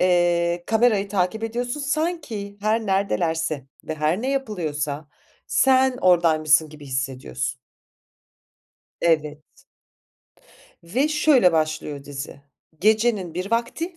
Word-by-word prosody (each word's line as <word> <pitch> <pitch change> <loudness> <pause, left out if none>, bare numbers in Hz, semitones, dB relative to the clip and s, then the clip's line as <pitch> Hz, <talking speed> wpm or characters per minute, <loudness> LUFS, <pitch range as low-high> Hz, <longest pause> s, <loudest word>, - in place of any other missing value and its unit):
Eee, 175 -1 +2
kamerayı 220 -3 +2
takip 195 +3 -1
ediyorsun. 245 +5 -3
Sanki 285 - -3
her 215 +2 0
neredelerse 165 -7 0 0.2
ve 155 - -4
her 155 +6 0
ne 265 - -1
yapılıyorsa, 155 - -3 0.4
sen 260 -1 +3
oradaymışsın 160 -3 +4
gibi 150 -1 -12
hissediyorsun. 130 - -3 1.4
Evet. 150 -2 +1 1.4
Ve 250 - 0
şöyle 300 - +4
başlıyor 155 -3 -2
dizi, 140 0 -7 0.4
gecenin 215 -4 +2
bir 185 +3 -4
vakti, 280 +10 -2
180 Hz, 100 wpm, -23 LUFS, 155-230 Hz, 1.4 s, oradaymışsın